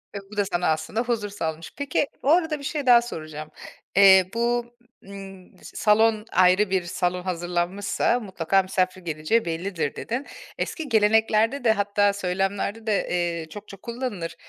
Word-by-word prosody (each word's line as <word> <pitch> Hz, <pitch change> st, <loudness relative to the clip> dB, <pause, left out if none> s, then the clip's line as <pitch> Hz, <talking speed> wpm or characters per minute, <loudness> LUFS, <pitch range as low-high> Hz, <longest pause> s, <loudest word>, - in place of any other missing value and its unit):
Ve -, -, -3 dB
bu 210 Hz, -, -10 dB
da 205 Hz, -, +2 dB
sana 180 Hz, -2 st, -1 dB
aslında 160 Hz, +8 st, -2 dB
huzur 230 Hz, -4 st, -2 dB
sağlamış. 160 Hz, -5 st, -5 dB
Peki, 285 Hz, 0 st, 0 dB, 0.2 s
o 275 Hz, -, +1 dB
arada 320 Hz, -3 st, +2 dB
bir -, -, -11 dB
şey 290 Hz, 0 st, -3 dB
daha 240 Hz, -2 st, +7 dB
soracağım. 155 Hz, -9 st, -7 dB, 0.5 s
Eee, 190 Hz, -2 st, +7 dB
bu, 235 Hz, +1 st, 0 dB, 0.4 s
ımm, 195 Hz, -2 st, -11 dB
salon, 215 Hz, 0 st, +2 dB
ayrı 185 Hz, +3 st, +4 dB
bir 190 Hz, -1 st, +1 dB
salon 180 Hz, +1 st, -2 dB
hazırlanmışsa 180 Hz, +6 st, -1 dB
mutlaka 190 Hz, -3 st, 0 dB
misafir 185 Hz, 0 st, -1 dB
geleceği 165 Hz, +7 st, 0 dB
bellidir, 165 Hz, -2 st, -3 dB
dedin. 250 Hz, +5 st, -4 dB, 0.3 s
Eski 315 Hz, -4 st, -4 dB
geleneklerde 220 Hz, +3 st, +3 dB
de, 230 Hz, -, +5 dB
hatta 205 Hz, -1 st, +2 dB
söylemlerde 195 Hz, +3 st, -2 dB
de, 210 Hz, -2 st, +1 dB
eee, 170 Hz, -2 st, -2 dB
çokça 200 Hz, +1 st, -10 dB
kullanılır. 230 Hz, -6 st, -5 dB
200 Hz, 150 wpm, -24 LUFS, 180-225 Hz, 0.5 s, daha